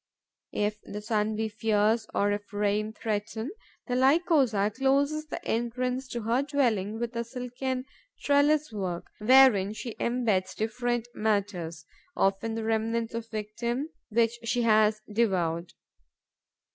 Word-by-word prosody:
If 210 0 -1
the 210 - -7
sun 215 0 0
be 220 +1 -1
fierce 220 +1 +1
or 205 0 +1
if 205 0 -4
rain 210 +1 0
threaten, 220 +4 -3 0.3
the 250 - -3
Lycosa 265 - +3
closes 280 +3 +1
the - - -6
entrance 250 +3 -1
to 240 -2 -5
her 235 +4 +2
dwelling 235 -8 0
with 235 0 -3
a 235 - -1
silken 255 +1 -4 0.4
trellis 290 0 +3
work, 185 -4 -3
wherein 215 -4 +6
she 230 +1 -6
embeds 220 -6 0
different 240 +2 -1
matters, 195 -7 -1 0.3
often 200 +4 +1
the 225 - -3
remnants 225 +1 0
of 230 0 -5
victims 235 +7 -3 0.2
which 230 +1 +1
she 240 +1 0
has 215 -1 +4
devoured. 175 -6 0
225 Hz, 130 wpm, -28 LUFS, 210-250 Hz, 0.4 s, wherein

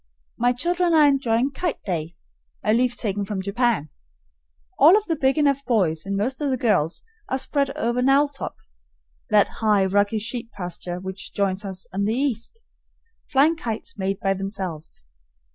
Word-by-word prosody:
My 245 +1 +2
children 345 +6 +1
are 305 -1 +7
enjoying 265 -2 +2
"kite 345 +4 -3
day," 170 -3 -3 0.5
a 215 - +2
leaf 240 +1 +1
taken 205 -2 -1
from 200 -1 -4
Japan. 200 - 0 0.9
All 330 +8 +8
of 425 - -2
the 330 - 0
big 270 0 +1
enough 280 -2 +2
boys 190 - 0
and 200 0 -1
most 255 +8 -2
of 290 - 0
the 260 - 0
girls 205 -10 +1 0.3
are 260 - 0
spread 280 +1 0
over 240 -2 0
"Knowltop" 275 +2 +1 0.7
(that 210 -1 +5
high, 210 -3 +3
rocky 205 +3 +2
sheep 230 +2 -4
pasture 180 -1 -5
which 190 +1 -6
joins 200 0 0
us 190 -2 -3
on 195 - -1
the 215 +3 +1
east) 270 - -3 0.7
flying 295 +4 +4
kites 230 -8 -5
made 195 -1 -2
by 195 0 +1
themselves. 190 - -6
225 Hz, 160 wpm, -23 LUFS, 195-270 Hz, 0.9 s, All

